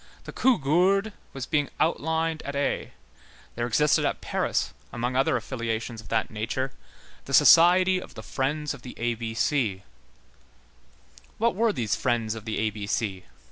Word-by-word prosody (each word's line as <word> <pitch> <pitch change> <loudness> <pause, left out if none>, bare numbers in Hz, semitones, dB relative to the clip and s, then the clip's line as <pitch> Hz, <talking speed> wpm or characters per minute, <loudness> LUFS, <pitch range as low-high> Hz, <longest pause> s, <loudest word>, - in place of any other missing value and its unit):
The - - -8
Cougourde 195 - +2 0.2
was 135 -2 -5
being 145 -1 0
outlined 160 0 0
at 140 - -6
Aix; 140 - -1 0.6
there 120 0 -2
existed 150 +6 +3
at - - -1
Paris, - - -1 0.2
among 120 +1 -2
other 135 +1 +2
affiliations 115 -2 -4
of 110 - -15
that 110 -1 -1
nature, 120 +5 -3 0.5
the - - +1
society 185 +2 +6
of - - -12
the - - -8
Friends 150 +3 -2
of 140 - -11
the 125 - -10
A 120 0 0
B 115 0 -5
C. 110 -6 0 1.5
What 235 +1 +2
were 225 +3 +2
these 120 - -1
Friends 115 -3 0
of 110 -1 -9
the 110 - -3
A 110 0 0
B 100 -1 -6
C? 100 -3 -2
130 Hz, 160 wpm, -26 LUFS, 115-160 Hz, 1.5 s, society